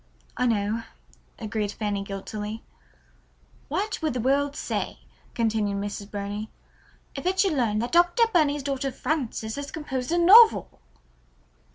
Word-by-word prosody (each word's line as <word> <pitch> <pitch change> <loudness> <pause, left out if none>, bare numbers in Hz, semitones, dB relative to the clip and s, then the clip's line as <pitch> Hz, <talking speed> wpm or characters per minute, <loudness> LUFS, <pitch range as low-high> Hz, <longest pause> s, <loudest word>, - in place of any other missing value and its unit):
"I 250 - +1
know," 215 0 0 0.6
agreed 215 -2 -3
Fanny 205 -2 -2
guiltily. 210 +2 -6 1.0
"What 420 0 -2
would 310 -4 0
the - - -1
world 280 +4 +1
say," - - -4 0.3
continued 220 -3 0
Mrs. 200 0 -5
Burney, 205 +1 -5 0.6
"if 275 - -6
it 375 +1 0
should 385 -4 +2
learn 235 -7 +1
that 235 +3 -2
Dr. 350 +6 +4
Burney's 295 -4 +2
daughter 275 -1 -2
Frances 250 -6 -3
had 285 0 -5
composed 265 -3 -4
a 345 - +2
novel!" 360 - +6
245 Hz, 135 wpm, -25 LUFS, 210-295 Hz, 1.0 s, novel